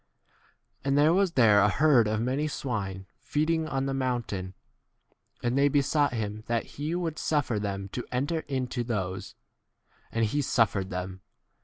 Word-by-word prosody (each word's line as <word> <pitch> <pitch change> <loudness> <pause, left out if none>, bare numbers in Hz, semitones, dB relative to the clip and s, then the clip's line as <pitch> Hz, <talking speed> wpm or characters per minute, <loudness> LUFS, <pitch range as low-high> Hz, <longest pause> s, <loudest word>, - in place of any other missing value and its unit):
And 140 +1 +1
there 150 +3 +5
was 190 -2 +2
there 110 -5 +6
a 100 0 +5
herd 135 -2 +4
of 110 0 0
many 135 +5 0
swine 100 -10 -3
feeding 160 +1 0
on 135 -2 -1
the 135 - -1
mountain, 120 -8 -2 0.9
and 120 +1 +1
they 140 +1 +4
besought 145 +1 +2
him 110 -2 -3
that 115 -1 0 0.2
he 155 +4 -1
would 165 -3 -2
suffer 130 -8 0
them 100 -1 -3
to 125 - -4
enter 140 +6 0
into 130 -3 -2
those; 95 -6 -3 0.8
and 115 0 +1
he 125 +8 0
88 - - +3
suffered 110 -7 +1
them. 95 0 -5
125 Hz, 160 wpm, -28 LUFS, 105-145 Hz, 0.9 s, there